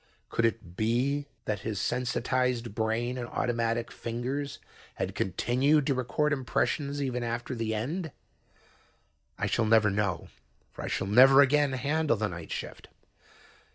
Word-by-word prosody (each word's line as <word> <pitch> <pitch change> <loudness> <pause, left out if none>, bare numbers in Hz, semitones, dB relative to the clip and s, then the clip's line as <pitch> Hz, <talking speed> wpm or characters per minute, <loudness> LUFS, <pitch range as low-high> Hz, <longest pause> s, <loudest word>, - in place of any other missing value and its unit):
Could 115 - +1
it 110 -6 -2
be 130 +7 0 0.2
that 105 -2 -1
his 105 -1 -3
sensitized 125 +1 0
brain 115 +3 -1
and 120 - -4
automatic 115 -1 -1
fingers 130 +5 -4 0.4
had - - -3
continued 130 - +2
to 140 - +2
record 140 +4 0
impressions 140 +2 -1
even 125 -2 -2
after 120 +1 -3
the 115 -2 -2
end? 155 - -3 1.3
I - - -1
shall 115 - +1
never 110 -1 +4
know, 100 -4 -1 0.4
for - - -9
I - - -3
shall - - -1
never 130 +7 +7
again 145 0 +3
handle 145 0 +1
the 105 0 -1
night 85 -2 -8
shift. - - -6
120 Hz, 140 wpm, -29 LUFS, 110-135 Hz, 1.3 s, never